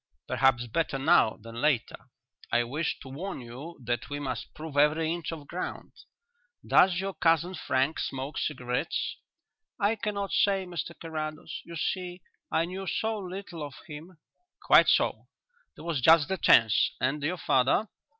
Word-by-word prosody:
"Perhaps 130 -1 +3
better 135 +4 -1
now 135 -4 +4
than 115 +2 -8
later. 145 -6 0 0.4
I 120 0 +3
wished 150 +7 -3
to - - -11
warn 170 +8 -5
you 130 +8 -9
that 120 0 -2
we 145 0 -4
must 130 -6 -4
prove 155 -2 -8
every 155 +3 +3
inch 170 -2 -4
of 155 -3 -7
ground. 180 +5 -5 0.7
Does 180 -1 +5
your 195 +1 -3
cousin 165 +2 +2
Frank 135 -2 0
smoke 135 +2 -3
cigarettes?" 125 -4 -2 0.6
"I 205 +3 +2
cannot 205 -2 -3
say, 195 -2 +2
Mr 170 -1 -6
Carrados. 155 -1 -5
You 170 - -9
see... 180 +3 -3 0.3
I 165 - +2
knew 190 +2 -6
so 220 +3 -1
little 185 -3 -7
of 145 -2 -6
him." 160 +3 -10 0.5
"Quite - - +7
so; - - +2 0.5
there - - -11
was 165 -6 -1
just 160 +2 +6
the 190 - 0
chance. 115 -3 +5
And 140 +4 0
your 165 +6 -1
father?" 145 - +2
155 Hz, 155 wpm, -28 LUFS, 135-180 Hz, 0.7 s, Quite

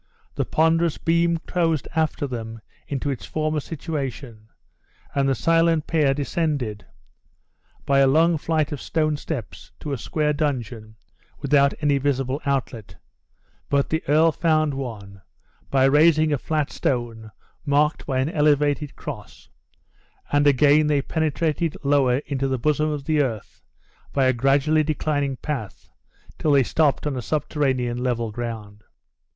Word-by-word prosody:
The - - -2
ponderous 165 0 +2
beam 170 0 +1
closed 165 -5 0
after 155 -2 0
them 115 -3 -6 0.3
into 140 0 -2
its 130 - -5
former 155 0 -1
situation; 135 -8 -6 0.7
and 135 -1 +1
the 135 - +2
silent 165 +1 +2
pair 150 -4 +2
descended, 140 - -2 1.0
by 140 0 +3
a 135 - +5
long 160 +4 +3
flight 155 -1 0
of 145 - -5
stone 155 -2 0
steps, 145 -6 -7
to 145 - -4
a 135 - -3
square 150 +7 -1
dungeon 120 -7 -3 0.4
without 140 -1 +3
any 145 -2 +2
visible 135 0 -1
outlet; 125 -6 -2 0.7
but 140 -1 +1
the 160 +1 0
earl 160 +3 +5
found 155 -2 +1
one, 105 -7 -7 0.5
by 135 -1 +3
raising 155 +2 +4
a 145 - 0
flat 150 0 -1
stone 115 -4 -2 0.3
marked 150 +1 +1
by 135 -2 -1
an 135 - -1
elevated 150 -1 +1
cross; 120 -9 -9 0.8
and 145 0 +3
again 145 +2 +4
they 145 -2 +1
penetrated 160 +1 -1
lower 140 -3 +3
into 135 -1 -2
the 130 -1 -1
bosom 150 +4 +1
of 150 -2 -3
the 155 -2 +2
earth 115 -7 -4 0.5
by 135 -2 +2
a 130 - +3
gradually 140 +5 +2
declining 145 -2 -1
path 125 - -6 0.5
till 150 - +2
they 140 -1 +5
stopped 150 +3 +1
on 145 -2 -1
a 125 - -3
subterranean 130 -4 -1
level 120 -3 -1
ground. 110 -2 -6
145 Hz, 140 wpm, -23 LUFS, 130-155 Hz, 1.0 s, a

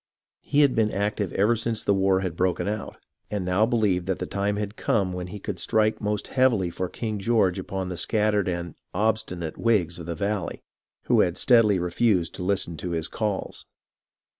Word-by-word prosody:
He 145 +1 +1
had 140 -3 +4
been 110 -1 +2
active 100 -1 -1
ever 105 +4 +3
since 115 -1 -2
the 100 - +3
war 95 -1 +2
had 90 -4 -3
broken 90 +1 0
out, 105 +1 -4 0.3
and 100 -3 -2
now 90 +5 +2
believed 105 -7 +1
that 95 - 0
the - - -3
time 100 +1 -1
had 105 0 -4
come 95 -5 0
when 90 0 -4
he 105 - -7
could 100 -2 -5
strike 110 +3 +1
most 105 -1 -2
heavily 120 -9 +2
for 90 +1 -3
King 110 -3 -4
George 100 -4 +2
upon 95 0 -4
the 90 - -5
scattered 105 0 +1
and 85 -3 -3 0.2
"obstinate" 105 -7 -1
Whigs 95 -8 +1
of 85 - -8
the 85 - -3
valley, 100 +1 -3 0.4
who - - +3
had 90 +1 +2
steadily 115 -5 +5
refused 90 +1 +1
to - - -6
listen 90 -3 -1
to 90 - -5
his 80 -1 -1
calls. 105 -3 -3
100 Hz, 190 wpm, -25 LUFS, 90-110 Hz, 0.4 s, steadily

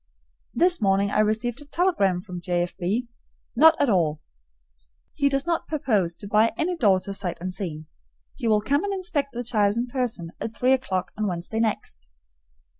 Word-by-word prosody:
This 350 -2 +3
morning 200 0 +2
I - - +1
received 220 +4 0
a - - -11
telegram 285 - +1
from 180 -2 -8
J. 175 -1 0
F. 175 - -6
B. 205 +7 -1 0.5
Not 320 0 +6
at 285 - +3
all! 165 -8 +1 0.9
He 280 -1 +2
does 275 +1 0
not 340 -1 -1
purpose 210 - 0
to 200 - -9
buy 215 +2 +3
any 355 +3 0
daughter 200 - +2
sight 195 -3 -3
unseen. 175 -3 -5 0.5
He 235 - -4
will 215 -1 +3
come 285 - +1
and 400 -1 -1
inspect 340 -7 -2
the 245 +1 -4
child 210 -4 +1
in 240 - 0
person 240 -9 -3
at 225 0 -5
three 255 +1 +3
o'clock 190 -9 -1
on 215 - +1
Wednesday 180 +4 -3
next. 205 - -2
215 Hz, 180 wpm, -25 LUFS, 185-275 Hz, 0.9 s, Not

